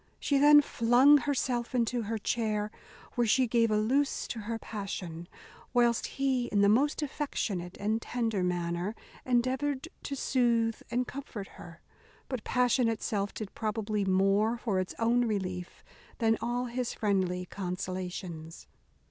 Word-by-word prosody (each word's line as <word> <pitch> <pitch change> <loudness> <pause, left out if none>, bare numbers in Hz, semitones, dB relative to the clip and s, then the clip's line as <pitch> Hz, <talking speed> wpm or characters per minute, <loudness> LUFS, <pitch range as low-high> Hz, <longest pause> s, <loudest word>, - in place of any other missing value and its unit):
She 280 -1 +1
then 295 +1 +8
flung 255 +5 +5
herself 255 -3 -1
into 240 0 +1
her 225 +1 -2
chair, 215 -1 -1 0.4
where 240 -1 +1
she 255 +4 +4
gave 230 -1 +2
a 215 - +2
loose 265 +7 +1
to 230 - -4
her 225 +2 -3
passion, 185 -6 -6 0.5
whilst 240 -1 +3
he, 265 -3 +1
in 205 - +1
the 200 - +5
most 285 +8 +2
affectionate 205 - -3
and 215 +3 0
tender 225 -6 -1
manner, 175 +2 -1 0.3
endeavoured 260 +4 0
to 280 - -4
soothe 235 -4 +1
and 250 +1 0
comfort 245 -7 -7
her; 170 -1 -13 0.5
but 255 -5 -3
passion 250 -1 +2
itself 205 -2 -2
did 215 -3 -7
probably 215 -1 -1
more 195 +4 +2
for 215 -5 -1
its 185 - -3
own 240 +1 +2
relief 185 -4 -4 0.3
than 225 -1 +3
all 245 +1 -1
his 245 0 -3
friendly 185 -3 0
consolations. 180 -3 -5
225 Hz, 140 wpm, -30 LUFS, 195-245 Hz, 0.5 s, then